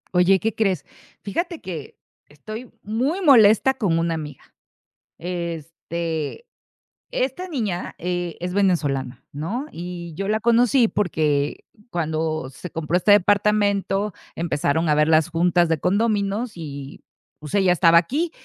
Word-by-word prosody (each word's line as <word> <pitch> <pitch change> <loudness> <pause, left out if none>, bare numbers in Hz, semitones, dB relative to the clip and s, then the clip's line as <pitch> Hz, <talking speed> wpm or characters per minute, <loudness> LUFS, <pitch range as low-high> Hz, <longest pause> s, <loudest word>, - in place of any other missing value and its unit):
Oye, 185 +2 +5
¿qué 225 +2 -1
crees? 190 -9 0 0.4
Fíjate 340 - -3
que 165 -6 -8 0.3
estoy 215 - -9
muy 255 - -1
molesta 255 - +6
con 200 -10 0
una 165 0 0
amiga. 150 -4 -6 0.7
Este, 170 - -4 0.7
esta 275 +9 -2
niña, 215 - -3
eh, 175 -1 -3
es 180 +1 -4
venezolana, 145 -10 0
¿no? 195 - -3
Y 175 -1 -7
yo 195 +4 -3
la 215 +1 +1
conocí 235 +1 +4
porque 155 -8 0 0.2
cuando 155 - -2
se 140 +7 -9
compró 165 +1 -2
este 185 +3 +3
departamento 205 0 +2 0.2
empezaron 160 0 0
a 150 - +4
haber 150 +1 +3
las 155 -1 +4
juntas 175 +1 +2
de 165 -1 0
condóminos 210 +2 0
y, 140 -4 -8 0.4
pues, 150 -1 -9
ella 190 -3 +4
estaba 170 -1 +5
aquí 295 - +1
180 Hz, 130 wpm, -22 LUFS, 160-215 Hz, 0.7 s, molesta